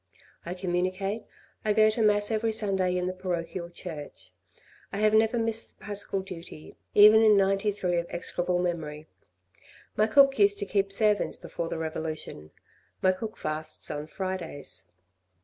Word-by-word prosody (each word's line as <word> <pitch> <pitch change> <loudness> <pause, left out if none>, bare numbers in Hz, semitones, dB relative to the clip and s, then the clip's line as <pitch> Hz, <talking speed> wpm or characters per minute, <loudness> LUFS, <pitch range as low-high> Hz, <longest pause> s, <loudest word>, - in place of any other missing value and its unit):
I 175 - -4
communicate, 185 +3 -2 0.4
I 215 - +2
go 215 0 +5
to 225 - -2
Mass 205 0 +3
every 220 0 0
Sunday 190 -4 0
in 180 - -1
the 185 - -2
parochial 175 -1 -4
church. 165 -4 -9 0.6
I - - -4
have 215 +1 +3
never 220 +2 +3
missed 225 0 -2
the - - -15
paschal 205 -1 -2
duty, 170 -4 -10 0.2
even 210 +1 +8
in 215 -2 +6
'93 195 -2 +1
of 170 - -4
execrable 175 +1 -2
memory. 160 -4 -3 0.9
My 215 - +3
cook 275 +2 +5
used 200 0 +5
to 200 - -2
keep 195 0 0
servants 210 0 +3
before 170 -1 -5
the - - -3
revolution, 155 - -5 0.5
my 185 - +5
cook 215 +4 -6
fasts 155 0 -3
on 150 0 -5
Fridays. 170 - -5
190 Hz, 150 wpm, -27 LUFS, 170-210 Hz, 0.9 s, even